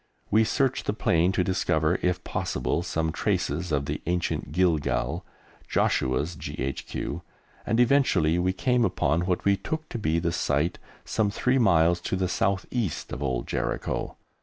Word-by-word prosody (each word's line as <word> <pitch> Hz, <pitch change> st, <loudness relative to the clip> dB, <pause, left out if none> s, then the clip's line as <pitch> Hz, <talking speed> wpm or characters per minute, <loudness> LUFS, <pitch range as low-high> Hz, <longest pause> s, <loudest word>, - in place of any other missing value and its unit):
We 110 Hz, +2 st, +5 dB
searched 135 Hz, +2 st, 0 dB
the -, -, +1 dB
plain 90 Hz, -4 st, +2 dB
to 95 Hz, -, +2 dB
discover, 95 Hz, +1 st, +1 dB
if 90 Hz, 0 st, 0 dB
possible, 80 Hz, -, -1 dB
some 80 Hz, -2 st, -1 dB
traces 80 Hz, +3 st, -1 dB
of 70 Hz, -2 st, +1 dB
the -, -, -3 dB
ancient 90 Hz, -4 st, -1 dB
Gilgal, 85 Hz, -3 st, +1 dB, 0.4 s
Joshua's 70 Hz, +6 st, +1 dB
G.H.Q., 75 Hz, 0 st, -4 dB, 0.5 s
and 115 Hz, +2 st, +1 dB
eventually 115 Hz, -, +3 dB
we 90 Hz, +1 st, +2 dB
came 125 Hz, +5 st, +1 dB
upon 85 Hz, -3 st, +1 dB
what 90 Hz, -2 st, -1 dB
we 100 Hz, 0 st, +5 dB
took 155 Hz, +9 st, -4 dB
to 120 Hz, -, -4 dB
be 80 Hz, -5 st, +1 dB
the 85 Hz, 0 st, 0 dB
site, 85 Hz, -1 st, 0 dB, 0.3 s
some 110 Hz, -2 st, +1 dB
three 125 Hz, +6 st, +1 dB
miles 85 Hz, -5 st, +4 dB
to 95 Hz, -, -2 dB
the 95 Hz, 0 st, 0 dB
south 95 Hz, +1 st, 0 dB
east 110 Hz, -, -2 dB
of 65 Hz, -, -5 dB
Old 65 Hz, -4 st, -1 dB
Jericho. -, -, -3 dB
90 Hz, 160 wpm, -26 LUFS, 80-105 Hz, 0.5 s, We